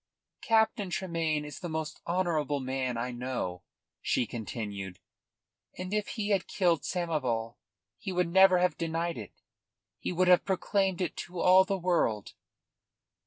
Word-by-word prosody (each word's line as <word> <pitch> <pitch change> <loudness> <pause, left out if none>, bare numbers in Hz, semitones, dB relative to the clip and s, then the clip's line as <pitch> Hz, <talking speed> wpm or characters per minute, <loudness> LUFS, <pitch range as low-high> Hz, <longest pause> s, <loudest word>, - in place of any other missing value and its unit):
"Captain 220 -3 +2
Tremayne 165 -5 -1
is 145 -2 -8
the 175 - -5
most 160 -1 -4
honourable 165 -5 0
man 130 -2 -2
I 125 +2 -2
know," 120 -8 -3 0.4
she 125 - +1
continued, 105 -5 -5 0.8
"and 185 +2 -5
if 210 -1 0
he 210 -1 -1
had 195 -3 +1
killed 175 -6 +2
Samoval 130 -10 -1 0.4
he 190 - -4
would 180 -1 +1
never 190 +1 +7
have 180 0 +1
denied 165 -2 -1
it; 105 - -9 0.7
he - - -3
would 180 +1 +2
have 180 -1 +6
proclaimed 190 -1 0
it 175 -4 -1
to 175 0 -6
all 185 +2 +6
the 195 0 -1
world." 170 - 0
170 Hz, 145 wpm, -30 LUFS, 130-185 Hz, 0.8 s, never